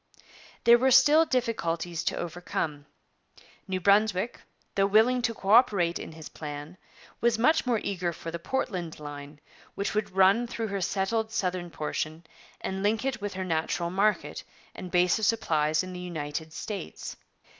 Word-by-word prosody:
' -, -, -22 dB
There 235 Hz, 0 st, +7 dB
were 265 Hz, +2 st, +3 dB
still 295 Hz, +5 st, +6 dB
difficulties 175 Hz, -, -1 dB
to -, -, 0 dB
overcome. 160 Hz, -4 st, -4 dB, 0.8 s
New 190 Hz, -1 st, -1 dB
Brunswick, 200 Hz, +2 st, +2 dB, 0.3 s
though 195 Hz, 0 st, +3 dB
willing 225 Hz, +5 st, +4 dB
to 230 Hz, -1 st, -1 dB
co 195 Hz, -, -6 dB
operate 200 Hz, -7 st, +4 dB
in -, -, -8 dB
his 160 Hz, -1 st, -9 dB
plan, 150 Hz, +4 st, -8 dB, 0.4 s
was 235 Hz, -1 st, +2 dB
much 300 Hz, +4 st, +3 dB
more 235 Hz, -3 st, +2 dB
eager 180 Hz, -3 st, -1 dB
for 165 Hz, 0 st, -7 dB
the 170 Hz, -, -5 dB
Portland 175 Hz, -7 st, -3 dB
line, 145 Hz, 0 st, -9 dB, 0.4 s
which 200 Hz, -, -2 dB
would 215 Hz, -, -1 dB
run 195 Hz, +5 st, +5 dB
through 230 Hz, -2 st, -4 dB
her 200 Hz, -1 st, -2 dB
settled 215 Hz, +5 st, -1 dB
southern 180 Hz, -3 st, -2 dB
portion 155 Hz, +1 st, -4 dB, 0.4 s
and 190 Hz, 0 st, -3 dB
link 215 Hz, +4 st, +1 dB
it 270 Hz, -5 st, -2 dB
with 205 Hz, -2 st, -4 dB
her 190 Hz, 0 st, -3 dB
natural 170 Hz, 0 st, -1 dB
market 205 Hz, +3 st, 0 dB, 0.3 s
and 185 Hz, -, -8 dB
base 180 Hz, +2 st, +3 dB
of 220 Hz, -, +1 dB
supplies 155 Hz, -8 st, +1 dB
in 185 Hz, 0 st, -7 dB
the 180 Hz, -, -6 dB
United 160 Hz, -3 st, -5 dB
States. 195 Hz, +2 st, -6 dB
190 Hz, 165 wpm, -28 LUFS, 165-220 Hz, 0.8 s, There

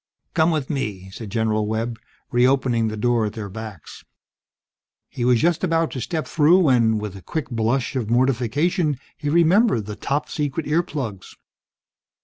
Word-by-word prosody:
"Come 160 Hz, -1 st, +3 dB
with 155 Hz, -5 st, -1 dB
me," 100 Hz, -9 st, -4 dB
said 110 Hz, +2 st, -8 dB
General 110 Hz, 0 st, 0 dB
Webb, 110 Hz, +1 st, -2 dB, 0.3 s
re 120 Hz, +1 st, +4 dB
opening 125 Hz, -4 st, +1 dB
the 110 Hz, 0 st, -4 dB
door 115 Hz, 0 st, +1 dB
at 105 Hz, -, -6 dB
their 105 Hz, -2 st, -6 dB
backs. 110 Hz, -5 st, -9 dB, 1.1 s
He 120 Hz, -, -4 dB
was 125 Hz, -1 st, +4 dB
just 170 Hz, +4 st, +1 dB
about 165 Hz, -2 st, +1 dB
to 130 Hz, -, -5 dB
step 160 Hz, +4 st, -2 dB
through 160 Hz, +3 st, +4 dB
when, 120 Hz, -10 st, +3 dB
with 105 Hz, -2 st, -5 dB
a 95 Hz, -, -10 dB
quick 155 Hz, -, -4 dB
blush 115 Hz, +3 st, 0 dB
of 120 Hz, -5 st, -2 dB
mortification, 135 Hz, -, +1 dB, 0.2 s
he 145 Hz, -, -3 dB
remembered 170 Hz, -, +3 dB
the 105 Hz, 0 st, -6 dB
"Top 140 Hz, +7 st, -2 dB
Secret" 150 Hz, 0 st, -3 dB
earplugs. 145 Hz, -, -2 dB
125 Hz, 160 wpm, -22 LUFS, 110-150 Hz, 1.1 s, re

